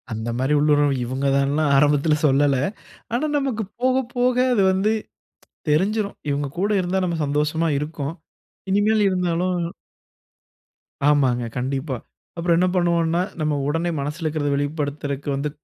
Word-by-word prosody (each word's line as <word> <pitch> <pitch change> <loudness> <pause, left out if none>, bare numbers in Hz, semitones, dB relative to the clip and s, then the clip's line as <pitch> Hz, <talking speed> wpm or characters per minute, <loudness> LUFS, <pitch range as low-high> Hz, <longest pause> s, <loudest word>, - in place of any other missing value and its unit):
அந்த 110 +1 -3
மாதிரி 130 +4 +1
உள்ளுண்ர்வு 145 -1 +3
இவங்க 130 +3 -3
தான்லாம் 140 +2 +1
ஆரம்பத்தில 150 +2 +3
சொல்லல. 140 0 +3 0.6
ஆனா 250 +6 +1
நமக்கு 265 -6 -1 0.2
போக 255 0 +3 0.2
போக 250 0 +2 0.2
அது 215 - +3
வந்து 190 +3 +1 0.8
தெரிஞ்சுடும். 200 +7 +1
இவங்க 145 0 -1
கூட 200 +3 +1
இருந்தா 185 +1 -1
நாம 170 -2 -2
சந்தோஷமா 150 +3 0
இருக்கோம். 150 0 -4 0.5
இனிமேல 210 +2 +3
இருந்தாலும் 180 0 0 1.5
ஆமாங்க 130 -5 +2
கண்டிப்பா. 135 +1 -2 0.4
அப்புறம் 170 0 +2
என்ன 180 +1 +3
பண்ணுவோம்ன்னா, 170 -1 +2 0.2
நம்ம 155 -1 0
உடனே 165 +4 0
மனசுல 150 +4 -4
இருக்கறத 150 -2 -1
வெளிப்படுத்துறதுக்கு 145 -1 -3
வந்து 140 +2 -2
155 Hz, 125 wpm, -22 LUFS, 140-180 Hz, 1.5 s, உள்ளுண்ர்வு